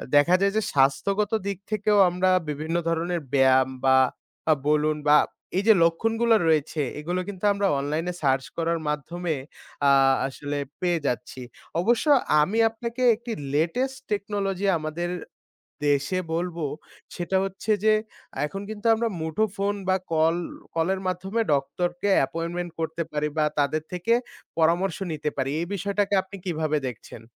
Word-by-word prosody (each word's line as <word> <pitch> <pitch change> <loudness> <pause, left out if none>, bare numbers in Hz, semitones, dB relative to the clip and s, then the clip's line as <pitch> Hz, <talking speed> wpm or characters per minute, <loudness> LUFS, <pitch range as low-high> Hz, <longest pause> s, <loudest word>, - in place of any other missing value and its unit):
দেখা 145 +5 +6
যায় 200 0 +2
যে - - +3
স্বাস্থ্যগত 195 +10 +2 0.2
দিক 200 -2 -2
থেকেও 210 0 +2
আমরা 180 +1 +1 0.2
বিভিন্ন 155 +3 -3
ধরনের 170 +1 -1
ব্যায়াম 130 -1 +4 0.2
বা 130 0 +6 0.5
আ - - +8
বলুন 150 0 +2
বা 150 +1 +7 0.4
এই 195 - +1
যে 220 - +9
লক্ষণগুলো 225 +7 +2
রয়েছে 155 -1 +1 0.2
এগুলো 175 +4 -2
কিন্তু 200 -2 -8
আমরা 200 0 +1
অনলাইনে 155 +5 -2
সার্চ 135 -2 +2
করার 165 0 0
মাধ্যমে 160 +3 -2 0.5
আ - - +6 0.4
আসলে 145 +2 -5 0.2
পেয়ে 175 -2 +1
যাচ্ছি। 125 +1 -3 0.4
অবশ্য 235 - +2 0.4
আমি 195 +9 +1
আপনাকে 235 +2 -6
একটি 235 +2 -8 0.2
লেটেস্ট 250 - 0
টেকনোলজি 200 -2 -1
আমাদের 155 +3 -3 0.8
দেশে 145 +6 +1
বলবো, 170 -1 -2 0.5
সেটা 180 +2 -1
হচ্ছে 195 +3 -3
যে 215 0 +5 0.5
এখন 195 +6 -6
কিন্তু 220 +1 -4
আমরা 230 +1 0
মুঠো 160 +7 0
ফোন 200 +1 0
বা 185 - +4 0.2
কল 160 +1 +3 0.4
কলের 185 +4 +1
মাধ্যমে 190 +5 -1
ডক্টর 140 +6 0
কে 205 - +1
অ্যাপয়েন্টমেন্ট 170 +5 -1
করতে 160 +1 -2
পারি 150 0 -1
বা 155 - +3
তাদের 145 +2 +1
থেকে 180 +6 0 0.4
পরামর্শ 170 +3 +2
নিতে 150 -1 -2
পারি। 135 0 -1
এই 170 - -3
বিষয়টাকে 200 +1 -1
আপনি 195 +1 -10
কিভাবে 155 -3 0
দেখছেন? 115 -1 -9
170 Hz, 145 wpm, -25 LUFS, 150-200 Hz, 0.8 s, যে